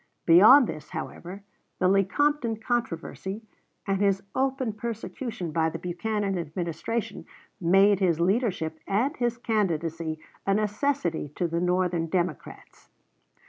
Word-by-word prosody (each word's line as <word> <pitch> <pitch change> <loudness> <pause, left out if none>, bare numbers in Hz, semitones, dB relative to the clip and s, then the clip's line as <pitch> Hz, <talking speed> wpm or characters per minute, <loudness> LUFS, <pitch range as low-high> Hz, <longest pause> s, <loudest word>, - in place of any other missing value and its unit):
Beyond 215 +11 +8
this, 155 -7 -7
however, 190 +3 -7 0.3
the 185 - +2
Lecompton 230 +6 +2
controversy, 215 -2 -3 0.4
and 195 -1 0
his 195 -1 +2
open 265 -3 0
persecution 215 -4 -5
by 160 0 +1
the - - -5
Buchanan 195 +2 -2
Administration, 175 +7 -4 0.3
made 195 +3 +4
his 175 -4 +2
leadership 180 -5 0
and 240 +10 +1
his 240 -1 0
candidacy 165 -8 -1 0.3
a 195 - +1
necessity 210 - -1
to 175 - 0
the 170 +1 -2
Northern 180 -2 +1
Democrats. 175 +1 -4
195 Hz, 115 wpm, -26 LUFS, 170-225 Hz, 0.4 s, Beyond